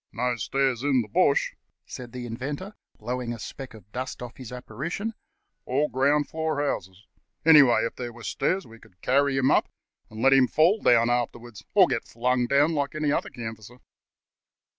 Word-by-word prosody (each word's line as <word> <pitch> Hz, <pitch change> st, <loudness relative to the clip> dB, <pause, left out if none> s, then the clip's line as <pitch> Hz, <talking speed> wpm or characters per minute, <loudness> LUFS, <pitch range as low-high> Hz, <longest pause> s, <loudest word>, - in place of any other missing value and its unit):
"No 125 Hz, +1 st, -1 dB
stairs 130 Hz, 0 st, 0 dB
in 135 Hz, -3 st, +2 dB
the -, -, -11 dB
bush," -, -, +2 dB, 0.3 s
said 125 Hz, -2 st, -9 dB
the 125 Hz, -1 st, -6 dB
Inventor, 140 Hz, -, -5 dB, 0.2 s
blowing 120 Hz, +1 st, -4 dB
a -, -, -7 dB
speck 125 Hz, +2 st, -8 dB
of 105 Hz, -1 st, -16 dB
dust 130 Hz, +1 st, -5 dB
off 120 Hz, 0 st, -9 dB
his 125 Hz, -3 st, -9 dB
apparition; 145 Hz, -, -5 dB, 0.5 s
"all 140 Hz, +4 st, +1 dB
ground 145 Hz, +3 st, +2 dB
floor 160 Hz, -2 st, -2 dB
houses. 95 Hz, -9 st, -3 dB, 0.4 s
Anyhow, 145 Hz, -8 st, +7 dB
if 115 Hz, -, -4 dB
there 120 Hz, -1 st, -5 dB
were 120 Hz, 0 st, -13 dB
stairs 190 Hz, +10 st, -1 dB
we 115 Hz, 0 st, -14 dB
could 90 Hz, -4 st, -21 dB
carry 140 Hz, +1 st, +2 dB
him 130 Hz, 0 st, +3 dB
up -, -, +3 dB, 0.4 s
and 110 Hz, -, -10 dB
let 135 Hz, +3 st, +5 dB
him 135 Hz, -2 st, +5 dB
fall 170 Hz, -, +3 dB
down 120 Hz, 0 st, +4 dB
afterwards, 120 Hz, -3 st, -3 dB
or -, -, +8 dB
get -, -, -2 dB
flung 125 Hz, +1 st, 0 dB
down 145 Hz, +5 st, +3 dB
like 145 Hz, -1 st, -2 dB
any 155 Hz, -2 st, 0 dB
other -, -, -1 dB
canvasser." 110 Hz, 0 st, -8 dB
125 Hz, 180 wpm, -26 LUFS, 120-145 Hz, 0.5 s, or